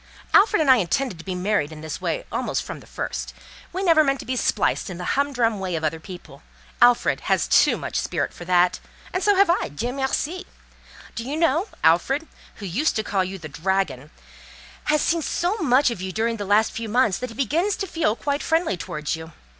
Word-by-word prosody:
Alfred 425 0 +5
and 285 -4 +5
I 255 - +7
intended 205 +1 -1
to - - -9
be 185 -2 -3
married 180 -4 0
in 155 -1 -9
this 155 0 -6
way - - -2
almost - - -1
from - - -7
the - - -16
first; - - -5 0.4
we 375 +2 -3
never 330 -4 +5
meant 275 -1 +1
to - - -11
be 255 - -2
spliced 240 - 0
in 180 - -6
the 180 - -6
humdrum 245 -6 +1
way 185 -2 -2
of 160 - -3
other 160 +1 -1
people; 175 -5 -11 0.4
Alfred 245 0 +4
has - - +2
too - - +4
much - - -4
spirit - - -2
for - - -10
that, 180 0 +3 0.3
and 370 - -1
so 410 +1 +4
have 395 +1 +5
I—Dieu 240 - -2
merci! 290 +7 -2 0.7
Do 230 - -5
you 280 +5 -4
know, 330 +4 +2 0.2
Alfred, 265 - +3 0.3
who 205 - -9
used 230 - 0
to 220 - 0
call 195 -2 0
you 190 +1 -5
'the 160 -4 -9
dragon,' 155 -4 -1 0.8
has 300 0 +2
seen 335 0 +1
so 355 +6 -1
much 275 - +3
of 195 - -5
you 190 0 -4
during 230 +3 -1
the 205 - -4
last 210 +3 +3
few 225 -1 -5
months, 220 -4 +2
that 250 - -4
he 230 - -11
begins 330 - 0
to 390 - -3
feel 325 - 0
quite 285 +3 -2
friendly 325 - +1
towards 150 -2 -3
you. 160 0 -10
230 Hz, 215 wpm, -23 LUFS, 180-300 Hz, 0.8 s, I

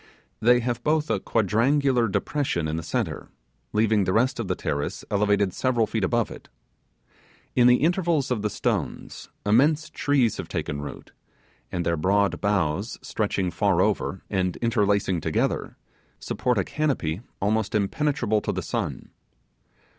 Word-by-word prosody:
They 120 +2 +4
have 120 0 -2
both 155 0 +1
a - - +1
quadrangular 120 +4 +2
depression 100 - -1
in 80 - -2
the 80 - -2
centre, 80 - -3 0.4
leaving 110 -1 +2
the 95 - 0
rest 125 +2 +2
of 115 - -2
the - - 0
terrace 70 0 -3
elevated 100 -2 +2
several 125 -3 +1
feet 110 -1 -2
above 120 +4 +1
it. - - -11 1.1
In 120 -1 +6
the 125 - +7
intervals 165 -5 +1
of 115 -4 0
the 105 - 0
stones - - -3 0.2
immense 150 +10 +3
trees 135 -8 +1
have - - -5
taken 70 0 -3
root, 70 - -8 0.6
and 90 -2 -2
their 85 0 +1
broad 100 +5 +1
boughs 100 0 0
stretching 95 -4 -1
far 100 -3 +1
over, 95 -1 0
and 95 -3 -1
interlacing 100 -6 +1
together, - - -1 0.4
support 125 -2 -1
a 95 - +2
canopy 110 - -1 0.2
almost 110 +2 0
impenetrable 110 +1 +1
to - - -2
the - - -3
sun. - - -4
110 Hz, 145 wpm, -25 LUFS, 95-125 Hz, 1.1 s, the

